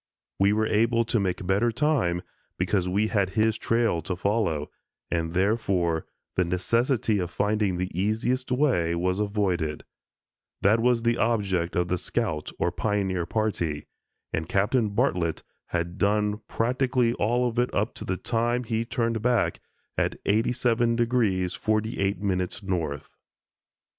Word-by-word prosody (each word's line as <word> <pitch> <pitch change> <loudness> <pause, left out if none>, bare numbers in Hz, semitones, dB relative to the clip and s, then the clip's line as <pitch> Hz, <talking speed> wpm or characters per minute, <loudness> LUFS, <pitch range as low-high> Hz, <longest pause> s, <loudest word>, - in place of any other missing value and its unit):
We 100 +1 +4
were 110 +1 +2
able 115 +2 +2
to 115 - +1
make 95 -1 -1
better 100 +6 +2
time 115 - +1 0.3
because 90 0 0
we 105 +4 +1
had 100 -4 +1
his 110 0 +3
trail 115 -6 +1
to 90 +3 -3
follow, 95 -6 0 0.4
and, 85 0 -1
therefore, 95 -5 +1 0.3
the 90 - +3
necessity 110 +5 +1
of 90 -2 -2
finding 105 -1 0
the 90 +1 -2
easiest 110 +8 0
way 125 - +2
was 90 +3 0
avoided. 95 -7 -1 0.8
That 110 +4 +5
was 120 0 +2
the 120 0 +2
object 95 -7 0
of 90 0 +1
the 90 0 -1
scout 75 -2 -2
or - - 0
pioneer 95 -5 -1
party 85 -9 -1 0.5
and 80 0 -2
Captain 105 +3 +2
Bartlett 90 -5 0 0.2
had 85 +2 -3
done 105 +1 +1
practically 125 0 +1
all 120 +3 +1
of 120 0 -2
it 125 - +1
up - - 0
to - - -8
the 95 - -2
time 120 +3 0
he 115 -1 -1
turned 115 -2 -1
back 120 -1 +1 0.4
at - - 0
87° 115 +2 +2
48´ 100 -3 0
north. 80 -7 -3
105 Hz, 140 wpm, -26 LUFS, 90-115 Hz, 0.8 s, That